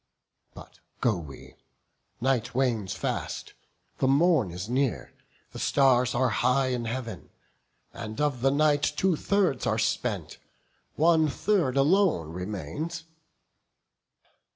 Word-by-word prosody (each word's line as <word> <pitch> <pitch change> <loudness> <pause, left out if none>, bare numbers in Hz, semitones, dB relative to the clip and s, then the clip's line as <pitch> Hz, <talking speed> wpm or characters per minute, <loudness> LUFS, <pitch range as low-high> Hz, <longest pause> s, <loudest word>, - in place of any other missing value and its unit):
But - - -13 0.2
go 115 -4 +2
we; 75 -6 -10 0.6
night 125 -2 0
wanes 115 -8 0
fast, - - -4 0.5
the 130 - +2
morn 145 - +3
is 90 +4 -6
near: 130 0 -1 0.4
The - - -8
stars 130 -3 +3
are 130 +1 +2
high 130 +1 +2
in 125 -2 -2
Heav'n; 115 - -5 0.6
and 110 -1 -7
of 145 -5 0
the 135 - +4
night 145 +1 +2
Two 165 +5 +1
thirds 195 -2 0
are - - +1
spent, - - -2 0.6
one 160 0 +4
third 155 -5 0
alone 150 - +3
remains." 105 - -5
130 Hz, 115 wpm, -27 LUFS, 115-150 Hz, 0.6 s, the